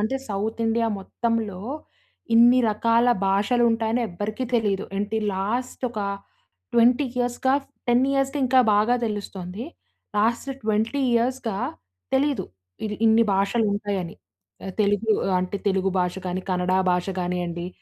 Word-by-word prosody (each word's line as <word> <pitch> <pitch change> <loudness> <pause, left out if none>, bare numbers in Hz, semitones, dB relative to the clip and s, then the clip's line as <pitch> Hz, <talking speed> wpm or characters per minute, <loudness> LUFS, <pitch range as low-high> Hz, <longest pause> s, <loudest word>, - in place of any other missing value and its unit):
అంటే 220 +6 0
south 215 +3 -2
India 230 +1 +1
మొత్తంలో, 220 -1 -2 0.7
ఇన్ని 240 +2 +7
రకాల 230 +3 +2 0.2
భాషలు 210 +5 +2
ఉంటాయని 225 +1 0
ఎవ్వరికీ 210 +7 -4
తెలీదు. 205 -4 +1
ఏంటి 210 +2 -1 0.2
లాస్ట్ 235 +8 -3
ఒక 215 - -4 0.7
20 245 +4 +4
ఇయర్స్‌గా, 245 +2 +1 0.3
10 240 +2 +4
ఇయర్స్‌గా 275 +1 0
ఇంకా 260 0 +5
బాగా 215 +4 +3
తెలుస్తుంది. 200 -1 -5 0.5
లాస్ట్ 235 +5 +1 0.2
20 220 +5 0
ఇయర్స్‌గా 235 -3 0 0.6
తెలీదు. 280 +1 +1 0.4
ఇది 210 - -3
ఇన్ని 225 +1 +5
భాషలు 200 +4 +1
ఉంటాయని. 200 -4 -3 0.6
తెలుగు 205 +1 +1 0.3
అంటే, 185 +2 -2
తెలుగు 190 0 +1
భాష 180 0 0
కానీ, 180 +1 -2
కన్నడ 180 0 0 0.2
భాష 180 +1 0
కానియ్యండి. 175 -1 -3
220 Hz, 120 wpm, -24 LUFS, 195-240 Hz, 0.7 s, ఇన్ని